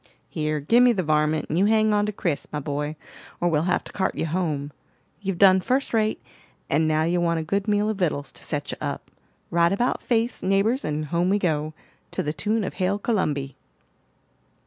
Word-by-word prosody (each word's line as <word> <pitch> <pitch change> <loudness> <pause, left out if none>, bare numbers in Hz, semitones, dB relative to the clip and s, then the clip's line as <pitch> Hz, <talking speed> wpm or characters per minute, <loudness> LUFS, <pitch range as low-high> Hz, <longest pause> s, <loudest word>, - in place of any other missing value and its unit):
"Here, 155 -1 -1
give 230 - +4
me 250 -1 +6
the 190 -4 -1
varmint, 150 0 +1
and 160 - 0
you 195 - +4
hang 215 0 +3
on 205 0 +2
to - - -1
Chris, 170 -7 -2
my 150 - -2
boy, 150 +1 -3 0.4
or 175 - +2
we'll 155 0 +1
have 180 - +1
to - - -11
cart 190 -1 -1
you - - -1
home. 155 -4 -2 0.5
You've 195 -3 -2
done 190 -1 +6
first 260 +8 0
rate, 220 -1 +1 0.5
and 155 +2 +3
now 155 0 +2
you 175 +2 +1
want 170 -1 +1
a - - -3
good 200 +6 -1
meal 210 0 +2
of 215 -2 -1
vittles 145 -5 -1
to - - -10
set - - -3
you - - -6
up. - - -5 0.4
Right 170 0 +3
about 240 +6 0
face, 235 0 0
neighbors, 200 +7 +1
and 150 0 -2
home 170 +4 0
we 200 - +3
go, 155 -5 -1 0.3
to - - -3
the 150 - -2
tune 215 +4 0
of - - -4
Hail 190 +2 0
Columby." 150 - -1
175 Hz, 210 wpm, -24 LUFS, 155-205 Hz, 0.5 s, me